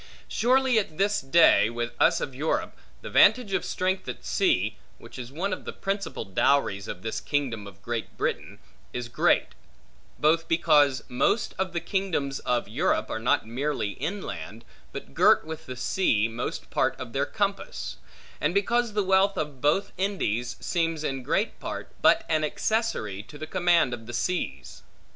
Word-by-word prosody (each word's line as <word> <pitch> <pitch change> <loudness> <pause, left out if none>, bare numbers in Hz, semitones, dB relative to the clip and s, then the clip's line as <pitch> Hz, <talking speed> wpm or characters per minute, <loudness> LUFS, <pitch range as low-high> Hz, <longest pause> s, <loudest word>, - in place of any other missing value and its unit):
Surely, 255 0 +3
at 160 -7 -5
this 205 +1 +2
day, 135 -5 +5
with 120 0 -3
us - - +4
of 135 - -4
Europe, 160 - -1 0.3
the - - -6
vantage 240 -6 +5
of - - +1
strength 185 +1 -1
at - - -7
sea 110 - +1 0.2
(which 115 +2 -12
is 125 0 -7
one 185 +7 -2
of - - -6
the - - -5
principal 195 +1 -3
dowries 100 0 +1
of 90 - -7
this 110 - -3
kingdom 125 -8 -2
of 100 +1 -14
Great 115 -1 -4
Britain) - - -2 0.4
is 125 -1 -4
great; 120 - +2 0.7
both 160 +2 +2
because 150 -5 +3
most 210 - +1
of 190 -1 0
the 170 - -1
kingdoms 165 -8 -2
of 120 -3 -1
Europe, 145 - 0
are - - -2
not 115 - +2
merely 130 -1 -2
inland, 140 - -5 0.3
but - - -8
girt - - +5
with 160 0 -7
the 125 - -5
sea 120 - +1
most 115 +2 -5
part - - +1
of - - -7
their - - 0
compass; - - -3 0.4
and 155 +5 +1
because 235 +3 +1
the 210 -1 +1
wealth 190 +1 +3
of 145 -4 -4
both 150 +7 +2
Indies 125 - -1
seems 165 -3 -1
in 135 -3 -2
great 180 - -1
part, - - -6
but - - +5
an 155 -1 +1
accessory 150 - -1
to 150 +7 -13
the 155 - -5
command 175 -5 +2
of 115 -2 -7
the 120 - -7
seas. 180 +9 -3
155 Hz, 170 wpm, -26 LUFS, 120-190 Hz, 0.7 s, day